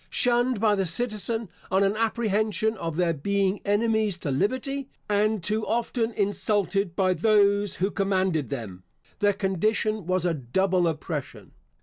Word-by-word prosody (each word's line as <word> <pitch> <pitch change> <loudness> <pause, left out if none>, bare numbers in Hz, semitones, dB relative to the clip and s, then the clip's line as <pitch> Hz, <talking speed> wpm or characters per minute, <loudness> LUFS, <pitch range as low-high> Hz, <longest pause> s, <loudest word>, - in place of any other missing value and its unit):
Shunned 245 -1 +2
by 215 -1 +3
the 195 -2 0
citizen 225 +2 -2 0.2
on 190 +1 +3
an 195 +1 +1
apprehension 220 -1 0
of 165 -5 -4
their 170 -1 +1
being 195 +5 0
enemies 215 -1 +1
to 145 - 0
liberty, 260 - -1 0.2
and 210 -1 +1
too 215 +4 0
often 230 0 0
insulted 200 -2 0
by 185 -1 +2
those 205 +1 +3
who 195 +3 -1
commanded 185 - 0
them, 95 -5 -6 0.4
their 205 -1 +3
condition 210 +1 -1
was 185 -1 +1
a 175 - +2
double 175 +7 +1
oppression. 155 -2 -5
200 Hz, 140 wpm, -26 LUFS, 185-220 Hz, 0.4 s, by